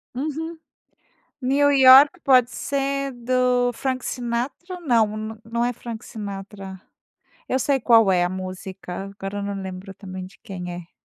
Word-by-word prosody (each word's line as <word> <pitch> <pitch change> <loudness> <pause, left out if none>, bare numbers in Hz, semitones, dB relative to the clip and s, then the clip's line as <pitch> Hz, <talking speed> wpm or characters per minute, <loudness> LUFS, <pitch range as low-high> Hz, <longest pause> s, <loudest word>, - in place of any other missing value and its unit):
Uhum. 315 +4 -4 0.8
New 285 +3 +3
York 275 +5 +8
pode 250 -3 +5
ser 275 0 -2
do 250 0 +1
Frank 260 +1 -3
Sinatra? 255 +9 -3
Não, 230 -8 +3
n 215 +1 -6
não 235 +2 -1
é 245 - 0
Frank 230 -1 -8
Sinatra. 195 -3 -7 0.7
Eu 260 - 0
sei 275 +1 +1
qual 225 -5 +5
é 175 -1 +3
a 175 - 0
música, 185 0 -6
agora 195 +1 -4
eu 200 - -3
não 200 -1 -4
lembro 190 +1 -7
também 185 -2 -8
de 190 - -16
quem 180 -4 -6
é. 175 0 -9
235 Hz, 150 wpm, -23 LUFS, 195-265 Hz, 0.8 s, York